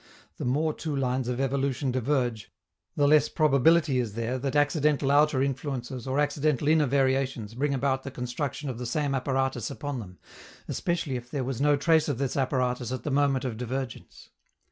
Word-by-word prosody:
The - - -4
more 150 +5 +1
two 155 -2 -4
lines 130 -2 -1
of 125 0 -2
evolution 135 0 0
diverge, 125 -4 -1 0.4
the 145 - +3
less 150 +1 +5
probability 155 -1 +3
is 115 -4 -2
there 115 +3 -2
that 135 +2 -3
accidental 145 -1 +2
outer 145 -2 +4
influences 130 -2 -4
or 130 +2 0
accidental 145 -1 +1
inner 155 -2 +4
variations 130 -4 0
bring 140 +3 0
about 135 0 0
the 135 - -6
construction 130 +3 -4
of 125 -3 -4
the 125 - -4
same 140 +3 -1
apparatus 135 0 -1
upon 145 -1 -4
them, 90 -5 -10 0.5
especially 165 -7 -2
if 120 0 -10
there 140 -1 -2
was 130 0 -3
no 145 0 +4
trace 160 +2 +3
of 140 - -1
this 135 -1 -2
apparatus 125 -2 0
at 130 - -4
the 150 - -2
moment 135 -2 +2
of 120 -4 -3
divergence. 125 +1 -6
135 Hz, 180 wpm, -27 LUFS, 125-145 Hz, 0.5 s, less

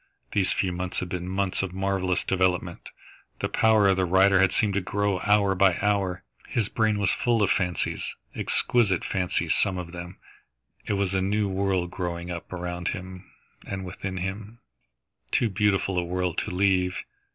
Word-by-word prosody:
These 95 -2 +2
few 95 - 0
months 90 +1 -4
had 90 - -4
been 90 -1 -4
months 95 0 0
of 95 -2 -4
marvellous 95 -1 0
development. 90 -2 0 0.5
The - - -1
power 110 -2 +4
of 95 -1 +3
the 95 - +2
writer 95 +2 +4
had 95 -1 +4
seemed 105 -3 +1
to 100 - +1
grow, 100 0 0
hour 100 0 +3
by 95 -1 +3
hour. 100 -4 0 0.3
His 110 -4 0
brain 110 -2 +1
was 100 -2 +2
full 115 -3 +1
of 100 - +2
fancies, 90 -3 -1 0.2
exquisite 105 -8 +1
fancies 90 -3 0
some 95 -3 +1
of 90 -1 -6
them. 90 +1 -8 0.7
It - - 0
was 100 -1 0
a 95 - +1
new 100 +2 +1
world 95 -2 0
growing 90 -1 -4
up 85 -1 -7
around 90 0 -4
him 95 -1 -6 0.3
and 95 -1 -5
within 95 0 -5
him, 100 +5 -5 0.7
too 115 - +1
beautiful 95 -2 +1
a - - -1
world 90 0 -1
to - - -3
leave. 90 -1 +1
95 Hz, 175 wpm, -26 LUFS, 90-100 Hz, 0.7 s, power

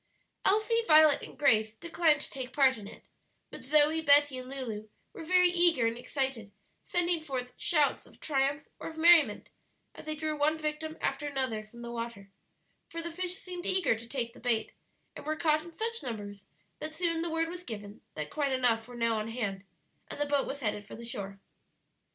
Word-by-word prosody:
Elsie, 435 +3 +3
Violet, 310 -2 +7
and - - -11
Grace 220 -5 +3
declined 330 0 +2
to - - -7
take 260 -2 -5
part 265 -2 +5
in 210 -3 -9
it, - - -13 0.5
but - - -9
Zoe, 300 +3 +4
Betty, 285 -3 +5
and 255 0 -9
Lulu 225 -6 -5 0.2
were - - -8
very 360 +2 +5
eager 345 -8 +3
and 230 0 +1
excited, 245 -4 -3 0.3
sending 350 -1 0
forth 255 -5 -5
shouts 300 -4 +1
of - - -19
triumph 280 0 0
or - - -5
of 320 - -11
merriment 320 -9 +5 0.4
as - - -12
they 310 - -2
drew 310 0 -2
one 300 +2 +2
victim 310 +1 -3
after 275 +2 -1
another 260 -6 -2
from 235 +3 -13
the 235 - -6
water; 230 -4 -6 0.6
for 335 0 -5
the 340 - -4
fish 365 +1 -1
seemed 360 -2 -6
eager 375 -7 +3
to 230 +1 -10
take 235 -2 -3
the - - -14
bait, 230 -2 0 0.4
and - - -8
were 310 +1 -1
caught 310 -1 +2
in 340 - -11
such 460 +6 -3
numbers 205 -4 -7 0.3
that 310 0 -5
soon 335 -1 0
the 340 - -2
word 325 0 0
was 350 +1 -6
given 205 - -8
that 150 -1 -5
quite 285 -2 0
enough 235 -3 +1
were 245 - -10
now 230 -2 +1
on 215 - -3
hand, 210 -5 -3 0.4
and - - -8
the 290 - +1
boat 285 -1 +1
was 280 +1 -5
headed 210 -3 -2
for - - -9
the 235 - -9
shore. 200 -4 -6
280 Hz, 200 wpm, -30 LUFS, 230-320 Hz, 0.6 s, Violet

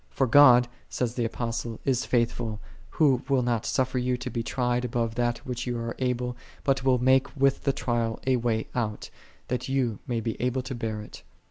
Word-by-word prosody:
" - - -37
For - - +1
God," 125 -2 +7 0.2
saith 120 -1 -2
the 120 - 0
Apostle, 115 0 -3
" - - -29
is 125 - -1
faithful, 115 -2 0 0.4
Who 135 -5 +4
will 135 -2 +3
not 120 -2 0
suffer 130 -1 0
you 125 0 0
to 125 - -5
be 115 - -2
tried 125 +1 -1
above 115 -2 -1 0.3
what 125 -1 -4
ye 120 - -1
are 115 0 -3
able; 125 -1 -1 0.3
but 135 -2 +1
will 130 -1 +4
make 130 +3 +2
with 135 0 +2
the 140 - +4
trial 120 -4 -1
a 130 -1 +3
way 115 -2 0
out, 110 -4 -3 0.4
that 125 +1 -2
ye 130 -6 0
may 120 -3 -1
be 115 -1 -4
able 125 +1 0
to 130 - -5
bear 110 -3 -3
it." 105 - -11
125 Hz, 205 wpm, -27 LUFS, 115-130 Hz, 0.4 s, God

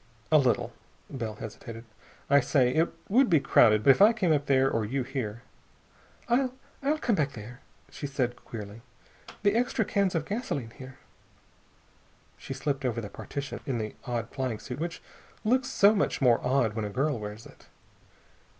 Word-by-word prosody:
"A 155 - +7
little." 120 -3 +1 0.4
Bell 115 -6 -4
hesitated. 115 +2 -9 0.4
"I 140 0 +6
say, 125 -1 +2
it 165 +2 +2 0.2
would 250 +4 +4
be 165 -4 +5
crowded, 110 -5 +4
but 135 - +8
if 135 - +2
I 215 +3 +8
came 185 -8 +2
up 145 -1 0
there, 135 -1 +4
or 115 -4 0
you 130 +5 -2
here...." 120 -4 -5 0.8
"I 255 +2 +2 0.3
I'll 290 +3 +1
come 245 -6 0
back 145 -7 0
there," 120 +2 -10 0.3
she 145 - -5
said 130 -3 -1
queerly. 105 0 -8 0.6
"The 205 -1 +4
extra 235 -2 +1
cans 195 -3 +1
of 160 -2 -1
gasoline 160 - -3
here...." 130 +2 -11 1.4
She 135 - -7
slipped 135 0 -2
over 120 -3 -1
the 105 -3 -6
partition, 140 +5 -6
in 130 -3 -1
the 110 -2 -4
odd 120 -2 -3
flying 130 -5 -2
suit 125 +4 -7
which 170 +1 -4 0.4
looks 255 +3 +2
so 210 -5 +5
much 205 - 0
more 125 -4 +3
odd 125 -4 +2
when 110 0 -3
a - - -3
girl 135 +3 0
wears 105 +1 -7
it. - - -17
135 Hz, 175 wpm, -28 LUFS, 115-165 Hz, 1.4 s, but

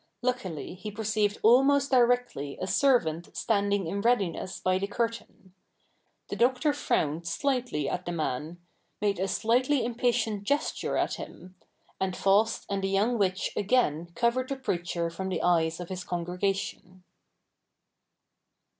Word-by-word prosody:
Luckily 195 - -2
he 205 +4 -7
perceived 210 0 0
almost 275 +4 +5
directly 245 - +2
a - - -2
servant 185 - +1
standing 200 -3 +1
in 200 +5 -2
readiness 195 -5 0
by 185 0 +1
the 200 - -2
curtain. 230 -4 -4 0.8
The - - -3
Doctor 255 +7 +2
frowned 165 - -1
slightly 245 - -1
at 180 - -3
the - - -1
man; 155 0 -3 0.4
made 200 -3 0
a 190 - 0
slightly 245 +6 +2
impatient 230 -3 0
gesture 285 +8 -1
at - - 0
him; 180 +1 -10 0.5
and 190 -1 -1
Faust 205 +3 +2
and 200 -1 -2
the 195 - 0
young 215 +5 +1
witch 190 -2 0
again 190 -7 +1
covered 250 +2 +1
the 275 - -1
preacher 175 -8 -2
from 190 +3 -4
the 185 - -2
eyes 165 -2 +2
of 175 - -7
his 185 -1 -5
congregation. 180 +1 -3
200 Hz, 135 wpm, -28 LUFS, 180-240 Hz, 0.8 s, almost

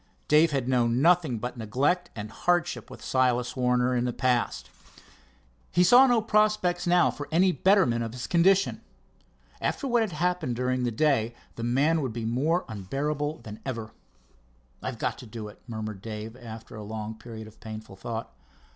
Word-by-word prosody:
Dave 155 +2 +5
had 135 -4 -1
known 120 -2 +2
nothing 165 -5 +3
but 125 +3 -5
neglect 140 - 0
and 105 -1 -6
hardship 175 +3 0
with - - -11
Silas 125 -2 +1
Warner 125 0 +2
in 120 0 +1
the 125 - 0
past. 125 -1 0 1.0
He 180 - +4
saw 245 +8 +7
no 240 -3 +3
prospects 210 -5 +2
now 175 0 +5
of - - -7
any 180 +4 +4
betterment 180 - +3
of 115 -1 -5
his 125 - -5
condition. 190 +3 +3 0.8
After 275 - -1
what 240 -2 +3
had 215 -6 -1
happened 170 -5 0
during 125 +1 0
the - - +1
day 120 -3 +1 0.2
the - - -7
man 145 +7 +2
would 130 -5 -3
be 115 -1 -4
more 145 +10 +1
unbearable 145 +9 -3
than 105 -1 -9
ever. 115 -5 -5 0.9
"I've 130 -2 -4
got - - -2
to 125 - -10
do 110 -1 -7
it," - - -16
murmured 110 -4 -5
Dave, 110 +1 -6
after 115 -2 -10
a 110 - -7
long 110 +1 -5
period 110 0 -9
of 110 - -15
painful 110 -2 -8
thought. 115 +3 -6
125 Hz, 175 wpm, -27 LUFS, 115-170 Hz, 1.0 s, saw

